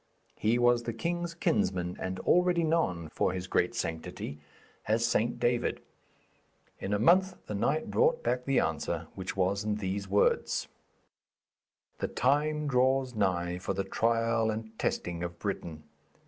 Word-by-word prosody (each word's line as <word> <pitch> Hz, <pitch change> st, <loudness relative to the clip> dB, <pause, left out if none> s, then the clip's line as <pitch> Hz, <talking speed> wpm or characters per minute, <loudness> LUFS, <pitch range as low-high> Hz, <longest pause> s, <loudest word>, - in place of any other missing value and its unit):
He 115 Hz, +3 st, +2 dB
was 120 Hz, 0 st, +4 dB
the 115 Hz, 0 st, -4 dB
king's 170 Hz, +7 st, -3 dB
kinsman, 90 Hz, -, 0 dB
and 95 Hz, 0 st, -3 dB
already 180 Hz, -1 st, +3 dB
known 155 Hz, -, +1 dB
for 90 Hz, -, 0 dB
his 90 Hz, -1 st, -4 dB
great 95 Hz, +4 st, +1 dB
sanctity 80 Hz, -6 st, -4 dB, 0.5 s
as 110 Hz, +2 st, +2 dB
St. 120 Hz, +1 st, +1 dB
David. 120 Hz, 0 st, +1 dB, 1.0 s
In 95 Hz, -, -4 dB
a 105 Hz, -, +2 dB
month 185 Hz, -, +4 dB
the -, -, -5 dB
knight 140 Hz, +10 st, 0 dB
brought 475 Hz, +1 st, +2 dB
back 125 Hz, 0 st, 0 dB
the 135 Hz, -1 st, +3 dB
answer, 80 Hz, +1 st, -2 dB
which 95 Hz, 0 st, -5 dB
was 95 Hz, +2 st, +1 dB
in 105 Hz, 0 st, 0 dB
these 100 Hz, -1 st, -3 dB
words: 100 Hz, +1 st, +2 dB, 1.3 s
'The -, -, -1 dB
time 150 Hz, +3 st, +1 dB
draws 130 Hz, 0 st, +2 dB
nigh 90 Hz, -4 st, 0 dB
for 95 Hz, +1 st, -3 dB
the 100 Hz, -, 0 dB
trial 115 Hz, +2 st, +1 dB
and 110 Hz, 0 st, -4 dB
testing 85 Hz, -1 st, -2 dB
of 85 Hz, -1 st, -4 dB
Britain. 85 Hz, -5 st, -4 dB
110 Hz, 145 wpm, -30 LUFS, 95-130 Hz, 1.3 s, was